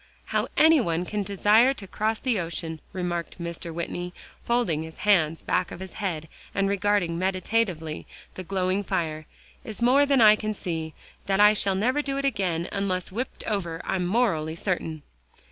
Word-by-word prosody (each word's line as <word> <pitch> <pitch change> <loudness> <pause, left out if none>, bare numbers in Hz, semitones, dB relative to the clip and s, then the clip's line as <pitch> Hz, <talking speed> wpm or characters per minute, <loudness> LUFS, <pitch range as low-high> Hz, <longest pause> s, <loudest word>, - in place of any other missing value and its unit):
"How - - 0
any 320 -2 +6
one 170 -4 -1
can 210 +2 -2
desire 210 +6 +4
to 205 - -8
cross 215 +3 -1
the 245 -6 0
ocean," 165 -2 -4
remarked 175 -2 -3
Mr. 170 0 -5
Whitney, 175 +2 -4 0.3
folding 235 -10 +1
his 160 0 -8
hands 165 -6 +3
back 185 - 0
of - - -8
his 190 0 -8
head 165 -6 -2 0.3
and 195 0 +2
regarding 200 -4 +1
meditatively 185 -4 -1 0.3
the - - -6
glowing 185 +1 0
fire, 155 -5 -2 0.4
"is 220 - -6
more 265 +4 +4
than 275 -2 +4
I 215 -2 +8
can 215 0 -3
see. 160 -4 -4 0.3
That 195 0 +1
I 210 0 +9 0.3
never 250 +9 +1
shall - - 0
do - - -2
it 275 - -1
again 185 -9 0
unless 190 -3 -2
whipped 245 +7 -4
over, 175 -6 -2
I'm 180 -2 -1
morally 175 -8 +1
certain." 165 -4 -3
190 Hz, 170 wpm, -26 LUFS, 170-215 Hz, 0.4 s, I